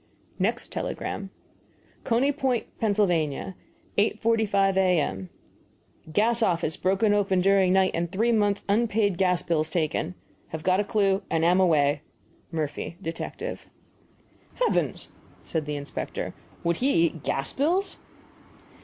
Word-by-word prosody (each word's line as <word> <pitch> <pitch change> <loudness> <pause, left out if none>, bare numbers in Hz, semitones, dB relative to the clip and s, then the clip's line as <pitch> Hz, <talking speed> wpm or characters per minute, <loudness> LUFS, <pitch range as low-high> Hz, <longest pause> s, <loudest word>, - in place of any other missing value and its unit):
Next - - -1
telegram: 195 -1 -4 0.8
CONEY 250 +4 +2
POINT, 265 -4 0
PA., 225 - +1
8.45 200 +3 0
A.M. 155 - +1 0.8
Gas 225 +6 +2
office 170 -6 +1
broken 195 +3 +2
open 195 -2 +2
here 195 +1 +5
during 190 -2 +4
night 190 -1 +4
and 170 0 -2
three 225 +5 +2
months' 205 -3 +1
unpaid 205 -3 +1
gas 180 -2 +2
bills 160 -2 0
taken. 160 +1 -1 0.3
Have 160 -1 -6
got 185 +2 +3
a - - +2
clue 200 -1 +1
and 165 0 +1
am 180 +2 +4
away. 150 -5 +3 0.5
MURPHY, 155 0 -3
Detective. 165 -3 -5 0.9
"Heavens!" - - 0 0.3
said 155 -3 -3
the 150 - -2
inspector; 145 0 -5 0.3
"would 170 0 +1
he 255 -10 +3
eat 160 -2 -3
gas 135 0 -1
bills?" 345 +8 +1
190 Hz, 125 wpm, -26 LUFS, 165-210 Hz, 0.9 s, here